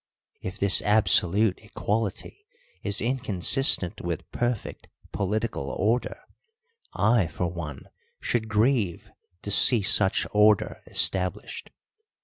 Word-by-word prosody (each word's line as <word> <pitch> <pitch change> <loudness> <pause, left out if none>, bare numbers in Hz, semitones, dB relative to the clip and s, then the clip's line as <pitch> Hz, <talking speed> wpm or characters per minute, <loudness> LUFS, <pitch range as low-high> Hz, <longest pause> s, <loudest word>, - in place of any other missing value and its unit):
If 95 +1 -7
this 100 -1 +2
absolute 105 -1 +2
equality 110 - -5 0.3
is 100 - -1
inconsistent 110 -3 +1
with 85 -2 -6
perfect 120 -2 -4 0.2
political 100 -7 -3
order, 115 +5 -2 0.7
I 110 -3 +1
for 85 +3 -4
one 85 -5 -7 0.4
should 110 -2 -3
grieve 105 -4 -1 0.3
to 100 - -5
see 110 +2 +5
such 95 0 +3
order 105 0 +2
established. 90 -1 0
105 Hz, 100 wpm, -25 LUFS, 90-115 Hz, 0.7 s, see